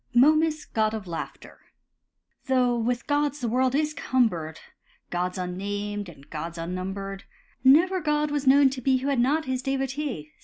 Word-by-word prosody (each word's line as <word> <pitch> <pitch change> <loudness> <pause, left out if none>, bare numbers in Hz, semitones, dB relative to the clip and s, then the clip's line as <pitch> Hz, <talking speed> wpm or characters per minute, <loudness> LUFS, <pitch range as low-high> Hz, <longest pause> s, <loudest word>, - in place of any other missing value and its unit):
MOMUS, 310 +4 +4
GOD 220 0 0
OF 215 -3 -6
LAUGHTER 170 -2 -7 0.9
Though 250 -2 +3
with 240 +1 -1
gods 290 0 0
the 245 - -2
world 255 +3 +1
is 305 +1 +1
cumbered, 215 - 0 0.5
Gods 180 +1 -2
unnamed, 200 +2 -4
and 145 -4 -15
gods 165 +2 -6
unnumbered, 190 +3 -5 0.4
Never 350 +8 +5
god 300 -1 0
was 290 -2 -2
known 275 0 +6
to 260 -1 -5
be 260 +1 +3
Who 265 +2 -2
had 275 -3 +1
not 295 +6 +2
his 260 -1 -2
devotee. 270 - -3
250 Hz, 155 wpm, -26 LUFS, 195-285 Hz, 0.9 s, known